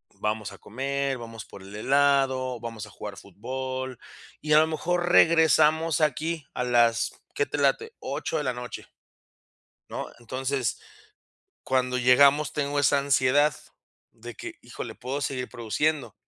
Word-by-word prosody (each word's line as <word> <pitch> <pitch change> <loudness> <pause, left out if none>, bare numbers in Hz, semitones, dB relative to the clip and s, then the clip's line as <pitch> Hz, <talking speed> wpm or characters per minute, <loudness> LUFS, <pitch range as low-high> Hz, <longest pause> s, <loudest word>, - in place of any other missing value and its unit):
vamos 105 -1 -2
a - - -12
comer, 135 +3 -2
vamos 115 -2 -9
por 100 - -13
el 100 +1 -12
helado, 130 +1 +2
vamos 115 -2 -6
a - - -13
jugar 105 0 -8
fútbol 130 +6 -5 0.4
y 150 - -4
a 150 - +8
lo 160 - +4
mejor 175 +2 -1
regresamos 160 -2 +4
aquí 155 +1 0
a 125 - -2
las, 120 -1 +3 0.2
¿qué 435 +2 +1
te - - -4
late?, 450 +1 +1
8 160 - -3
de 150 - -1
la 130 - 0
noche 125 0 -7 1.0
¿no? - - -5
Entonces, 130 +1 -2 0.8
cuando 125 -1 0
llegamos, 140 +4 +5
tengo 145 -1 -2
esa 145 0 +4
ansiedad 140 +2 +3 0.6
de 120 0 -10
que, - - -8
híjole, - - -8
puedo 135 +4 -4
seguir 130 -2 -2
produciendo. 125 +1 -1
130 Hz, 145 wpm, -26 LUFS, 120-150 Hz, 1.0 s, a